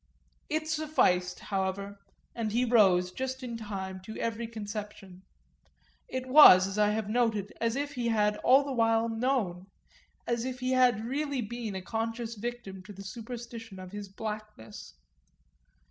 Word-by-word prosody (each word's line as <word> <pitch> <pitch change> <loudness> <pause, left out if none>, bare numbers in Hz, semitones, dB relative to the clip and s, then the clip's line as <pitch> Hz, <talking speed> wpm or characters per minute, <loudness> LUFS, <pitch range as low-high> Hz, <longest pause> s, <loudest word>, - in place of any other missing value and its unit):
It 310 0 -1
sufficed, 305 - +1
however, 195 +1 -3 0.3
and 225 -2 -3
he 240 +3 +2
rose, 190 -7 +4
just 260 +4 -4
in 240 -2 -5
time, 195 -4 -5
to 220 +4 -9
every 230 0 -2
conception; 210 -4 -7 0.9
it 260 0 -4
was, 255 -9 +9
as 195 +2 -3
I 210 0 +4
have 220 +1 0
already 210 +1 -5
noted, 215 -4 0
as 230 0 +1
if 285 +1 -3
he 245 -3 -2
had 210 -2 +2
all 265 +3 +5
the 280 - -5
while 225 -1 +2
known, 225 -7 -1 0.6
as 235 -1 -1
if 255 0 -4
he 255 0 -1
had 250 -4 +3
really 280 +1 -2
been 230 -2 -5
a 190 - -5
conscious 225 +2 -3
victim 225 -4 -6
to 205 - -10
the 195 +1 -10
superstition 230 0 -8
of 185 -1 -9
his 205 -1 -7
blackness. 210 - -8
225 Hz, 160 wpm, -29 LUFS, 200-245 Hz, 0.9 s, was